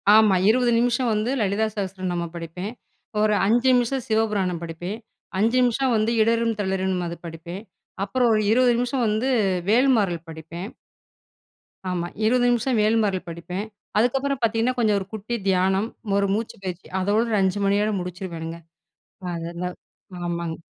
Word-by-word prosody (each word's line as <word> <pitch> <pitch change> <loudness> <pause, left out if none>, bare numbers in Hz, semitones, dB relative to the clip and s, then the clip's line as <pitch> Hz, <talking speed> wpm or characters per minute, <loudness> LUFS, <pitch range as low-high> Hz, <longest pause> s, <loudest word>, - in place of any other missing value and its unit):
ஆமா 215 -3 +6
20 245 +1 +3
நிமிஷம் 245 0 +1
வந்து 215 +3 0
"லலிதா 205 +2 +1
சஹஸ்ர 190 -2 -4
நாமம்" 170 -1 -3
படிப்பேன். 170 +4 -5 0.5
ஒரு 215 0 +3
5 240 +5 +3
நிமிஷம் 250 +1 +1
"சிவபுராணம்" 210 -6 0
படிப்பேன். 175 +5 -5 0.4
5 225 +5 +2
நிமிஷம் 250 +1 +2
வந்து 215 +2 +1
"இடறும் 230 0 +2
தளிரும்னு" 190 -2 -1
அது 170 - -6
படிப்பேன். 170 +4 -7 0.4
அப்புறம் 240 +4 +2
ஒரு 215 - +3
20 245 +1 +4
நிமிஷம் 245 0 0
வந்து 220 +5 0 0.4
"வேல்மாறல்" 220 -7 +3
படிப்பேன். 165 +3 -7 1.2
ஆமா 175 -1 -2 0.2
20 245 +2 +3
நிமிஷம் 240 0 +1
"வேல்மாரள்" 210 -4 +1
படிப்பேன். 180 +5 -5 0.3
அதுக்கப்புறம் 265 +4 +1
பாத்தீங்கன்னா 230 +2 +1
கொஞ்சம் 215 -3 +3
ஒரு 190 - -7
குட்டி 220 +3 -3
தியானம். 190 +3 +2 0.3
ஒரு 200 0 +2
மூச்சு 220 +1 -3
பயிற்சி. 185 -1 -5
அதோடு, 215 +4 +1
5 190 +2 +1
மணியோட 205 +2 +2
முடிச்சிருவேனுங்க. 170 -2 -6 0.7
அதுதெல்லாம் 170 +2 -4 0.5
ஆமாங்க. 170 -1 -3
205 Hz, 135 wpm, -24 LUFS, 180-230 Hz, 1.2 s, ஆமா